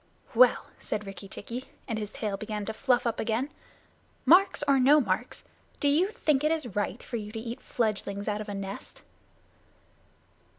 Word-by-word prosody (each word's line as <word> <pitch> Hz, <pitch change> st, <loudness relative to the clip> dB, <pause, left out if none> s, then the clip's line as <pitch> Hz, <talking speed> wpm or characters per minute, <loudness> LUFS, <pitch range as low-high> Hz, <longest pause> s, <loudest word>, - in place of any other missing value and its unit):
"Well," -, -, +5 dB
said 210 Hz, -, -3 dB
Rikki 195 Hz, 0 st, -8 dB
tikki, 235 Hz, +6 st, -6 dB, 0.2 s
and 225 Hz, -3 st, -2 dB
his 210 Hz, -1 st, -4 dB
tail 210 Hz, -2 st, -3 dB
began 210 Hz, 0 st, -4 dB
to 220 Hz, -, -3 dB
fluff 250 Hz, +1 st, +2 dB
up 235 Hz, -, -1 dB
again, 235 Hz, +6 st, -1 dB, 0.7 s
"marks 370 Hz, -1 st, +6 dB
or 275 Hz, -1 st, +5 dB
no 280 Hz, +4 st, +7 dB
marks, 225 Hz, 0 st, -2 dB, 0.4 s
do 285 Hz, -, +1 dB
you 310 Hz, +7 st, +4 dB
think 305 Hz, -, +1 dB
it 305 Hz, -, +3 dB
is 285 Hz, -, -2 dB
right 205 Hz, +1 st, -2 dB
for 240 Hz, -, -4 dB
you 210 Hz, -1 st, -6 dB
to 225 Hz, -, -5 dB
eat 235 Hz, +3 st, -6 dB
fledglings 205 Hz, -3 st, -2 dB
out 210 Hz, 0 st, -1 dB
of 210 Hz, -, -7 dB
a 205 Hz, -, -3 dB
nest?" 195 Hz, 0 st, -7 dB
225 Hz, 175 wpm, -28 LUFS, 205-275 Hz, 0.7 s, no